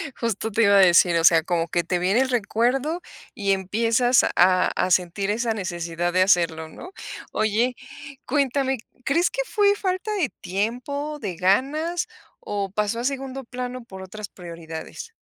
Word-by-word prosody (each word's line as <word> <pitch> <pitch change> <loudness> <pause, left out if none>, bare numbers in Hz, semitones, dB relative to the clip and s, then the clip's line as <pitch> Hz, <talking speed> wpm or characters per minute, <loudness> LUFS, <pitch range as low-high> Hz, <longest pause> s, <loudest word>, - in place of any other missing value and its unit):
Justo 225 -1 -2
te 230 +3 +2
iba 200 -1 +5
a - - +7
decir, 175 -2 +6
o 165 - +1
sea, 165 -1 +6
como 170 -1 -1
que 170 +1 0
te 175 +2 -1
viene 190 +7 +2
el 265 - 0
recuerdo 250 - 0 0.3
y 200 -1 -1
empiezas 230 +6 +2
a 185 +1 +4
a 185 - 0
sentir 185 +3 +1
esa 230 +1 0
necesidad 175 -3 -3
de 185 - +3
hacerlo, 170 -4 +2
¿no? 360 - -11 0.4
Oye, 220 +4 +1 0.5
cuéntame, 270 -1 0 0.3
¿crees 335 +7 +2
que - - -2
fue 410 -4 +3
falta 375 +1 -2
de 360 -10 0
tiempo, 250 +10 -3
de 200 -8 -4
ganas 280 - +1 0.3
o 200 -2 -4
pasó 210 +2 -1
a - - -3
segundo 270 0 -3
plano 250 0 -6
por 190 -5 -11
otras 200 +2 -8
prioridades? 170 - -9
215 Hz, 160 wpm, -23 LUFS, 185-265 Hz, 0.5 s, a